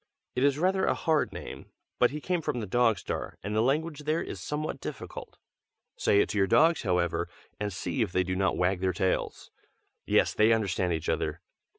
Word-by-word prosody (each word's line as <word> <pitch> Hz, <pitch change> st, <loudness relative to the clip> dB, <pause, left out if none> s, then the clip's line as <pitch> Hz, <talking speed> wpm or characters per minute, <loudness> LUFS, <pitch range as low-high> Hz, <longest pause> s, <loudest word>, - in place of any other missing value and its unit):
It 125 Hz, -, +1 dB
is 140 Hz, 0 st, +3 dB
rather 190 Hz, +3 st, +2 dB
a -, -, +2 dB
hard 160 Hz, -3 st, +1 dB
name, -, -, -8 dB, 0.3 s
but 125 Hz, -, +5 dB
he 150 Hz, -, -5 dB
came 180 Hz, +2 st, -1 dB
from 125 Hz, -, -2 dB
the 110 Hz, -, -3 dB
Dog 115 Hz, +1 st, +3 dB
Star, -, -, -5 dB
and 105 Hz, +2 st, -3 dB
the 110 Hz, -, +3 dB
language 150 Hz, +5 st, 0 dB
there 155 Hz, +2 st, +1 dB
is -, -, -6 dB
somewhat 150 Hz, +1 st, -3 dB
difficult. -, -, -7 dB, 0.6 s
Say 100 Hz, -, +3 dB
it -, -, 0 dB
to 105 Hz, -, -1 dB
your 95 Hz, -, +3 dB
dogs, 160 Hz, -, +4 dB
however, 90 Hz, -4 st, 0 dB, 0.3 s
and 105 Hz, 0 st, -2 dB
see 110 Hz, +7 st, -3 dB
if 105 Hz, -5 st, 0 dB
they 90 Hz, 0 st, +2 dB
do 90 Hz, 0 st, -2 dB
not 95 Hz, +1 st, +1 dB
wag 90 Hz, +1 st, +1 dB
their 95 Hz, 0 st, 0 dB
tails. 95 Hz, +2 st, -1 dB, 0.6 s
Yes, -, -, +3 dB
they 110 Hz, +2 st, +4 dB
understand 95 Hz, -5 st, 0 dB
each 80 Hz, -2 st, -2 dB
other. -, -, -1 dB
110 Hz, 205 wpm, -28 LUFS, 95-150 Hz, 0.6 s, but